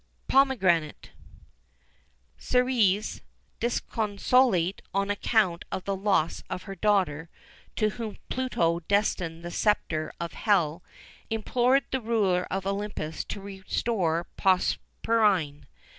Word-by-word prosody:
POMEGRANATE. 195 - +2 1.2
Ceres, 235 -5 +1 0.4
disconsolate 215 -4 +1
on 200 +1 +1
account 205 -4 +1
of 185 - -3
the 195 - -2
loss 190 -5 +1
of 180 - -4
her 195 - -7
daughter, 185 -7 +1 0.5
to 215 -1 +2
whom 220 -1 -6
Pluto 170 -10 0
destined 175 -3 -1
the 175 - -5
sceptre 165 -6 0
of 170 0 -4
Hell, 175 -6 +1 0.5
implored 245 +4 +2
the 265 - -1
ruler 205 -6 +1
of 195 0 -3
Olympus 195 -6 -3
to 200 - -6
restore 190 -3 -1
Proserpine. 185 -5 +1
195 Hz, 100 wpm, -27 LUFS, 170-220 Hz, 1.2 s, POMEGRANATE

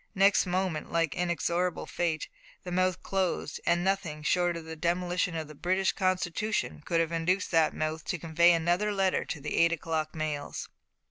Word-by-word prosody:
Next 195 0 +4
moment, 180 -3 -1
like 165 -3 +1
inexorable 175 0 -1
fate, 165 -3 -2 0.4
the 180 - -6
mouth 185 0 +1
closed, 190 -2 -1
and 175 +1 +3
nothing 185 -6 -1
short 175 +2 +2
of 165 - -8
the 160 0 -6
demolition 175 +1 0
of 160 -2 -3
the 155 - -10
British 185 +5 +1
Constitution 185 - -1
could 165 - +1
have 165 0 +1
induced 175 +4 0
that 165 -2 +3
mouth 155 0 -2
to 180 - -2
convey 170 +2 +4
another 175 +5 +2
letter 195 -2 +1
to 155 - -5
the 150 - -4
eight 170 0 +5
o'clock 160 -1 -2
mails. 155 -2 -3
175 Hz, 175 wpm, -29 LUFS, 160-185 Hz, 0.4 s, eight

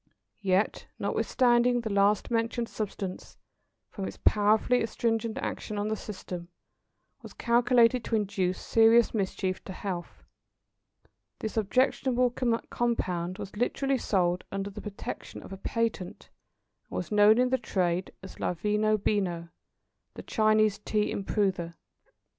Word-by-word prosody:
Yet, 195 +1 +1
notwithstanding 245 -1 +2
the 220 -3 -3
last 200 +3 +2
mentioned 230 +1 0
substance, 195 -4 -5 0.5
from 195 -2 -4
its - - -8
powerfully 215 +4 +3
astringent 225 0 -1
action 210 - -4
on 205 +1 -1
the 220 - 0
system, 185 -4 -7 0.7
was - - -11
calculated 235 0 +3
to 230 - 0
induce 195 -3 0
serious 225 +1 +4
mischief 190 -2 -2
to 190 - -6
health, 180 -2 -6 1.1
this 220 - -5
objectionable 250 +3 +2
compound 230 -7 -1
was 195 - -8
literally 265 +4 0
sold 180 -4 +1
under 195 +1 -3
the 210 +1 -8
protection 205 -1 -7
of - - -9
a - - -7
patent, 225 -3 -3 0.6
and - - -7
was 180 - -4
known 210 +1 +6
in 250 0 +3
the 260 0 +1
trade 185 -4 -1
as 190 - -11
"La 180 - -1
Veno 210 +4 +1
Beno, 180 -5 -1 0.7
the - - -8
Chinese 215 -2 +2
Tea 210 0 0
Improver." 190 -4 -1
210 Hz, 130 wpm, -28 LUFS, 190-230 Hz, 1.1 s, known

